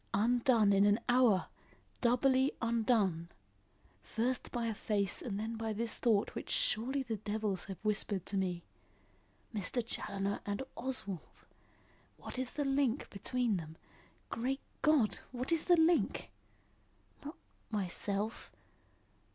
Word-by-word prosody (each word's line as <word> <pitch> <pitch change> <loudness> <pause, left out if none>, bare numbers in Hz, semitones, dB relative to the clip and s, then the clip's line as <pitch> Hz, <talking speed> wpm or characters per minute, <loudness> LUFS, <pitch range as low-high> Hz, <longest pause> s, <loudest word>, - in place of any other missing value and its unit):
Undone 230 -1 +4
in 195 0 +5
an 205 +2 +4
hour! 245 -6 +4 0.6
Doubly 260 +2 +3
undone! 220 -8 +1 0.7
First 230 - -2
by 235 -1 -1
a 225 - 0
face 200 -2 -1
and 205 -4 -3
then 225 +2 -3
by 225 -1 -2
this 225 +1 -2
thought 220 -4 +1
which - - -6
surely 270 - +1
the 230 -4 -3
devils 210 -1 -2
have 195 -2 -6
whispered 205 -3 -1
to 200 - -4
me. 180 -3 -1 0.9
Mr. 220 +3 -1
Challoner 200 -3 -2
and 205 +4 -2
Oswald! 205 -9 -3 0.7
What - - -7
is 255 -1 -3
the 290 - -1
link 270 -1 +1
between 235 +1 0
them? 160 -1 -8 0.5
Great 265 +4 -1 0.2
God! 290 -8 +3
what 250 +4 -3
is 330 -2 +2
the 350 -1 +5
link? 325 +1 +2 0.9
Not 295 +4 -7 0.3
myself? 205 +1 -2
225 Hz, 125 wpm, -34 LUFS, 200-255 Hz, 0.9 s, in